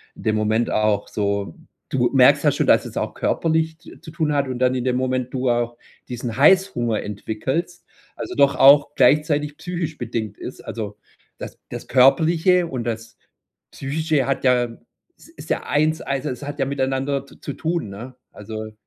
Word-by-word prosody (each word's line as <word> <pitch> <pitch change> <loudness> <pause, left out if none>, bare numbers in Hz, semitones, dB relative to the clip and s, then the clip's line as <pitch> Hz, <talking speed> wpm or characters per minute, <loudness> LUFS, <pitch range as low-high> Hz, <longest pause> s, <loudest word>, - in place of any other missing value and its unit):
in - - -12
dem 110 - +1
Moment 110 +2 0
auch 105 -1 +1
so 100 -4 -2 0.3
du - - +1
merkst - - +5
ja - - +4
schon, - - -1
dass - - +4
es - - -9
auch - - -2
körperlich 160 -1 0
z 170 - -15
zu 160 - -10
tun 155 -2 -1
hat 140 -1 +1
und 125 -1 -4
dann 130 0 +2
in 125 - -2
dem 125 -1 +1
Moment 130 0 -1
du 130 -1 0
auch 120 0 0 0.3
diesen 120 -1 -5
Heißhunger 140 - +3
entwickelst, 130 - -4 0.3
also, - - -6
doch 140 -1 +4
auch 140 +1 +6
gleichzeitig 150 -1 +2
psychisch 170 -4 -4
bedingt 110 -3 -4
ist. - - -8
Also, 105 -3 -6 0.4
das - - -8
das - - -7
Körperliche 160 +7 +4
und 130 -6 -4
das 115 0 -5 0.5
Psychische 145 -1 -1
hat 135 - -1
ja 120 -2 +2 0.4
es - - -18
ist 330 - -13
ja - - -1
Eins, 155 +2 +1
also, 140 +2 -3
es 125 +2 -6
hat 145 0 -6
ja 135 - +2
miteinander 135 0 -1
z 140 - -19
zu 145 - -4
tun, 165 -6 -2
ne? 120 +6 -9 0.2
Also, 110 +1 -8
130 Hz, 180 wpm, -22 LUFS, 120-150 Hz, 0.5 s, auch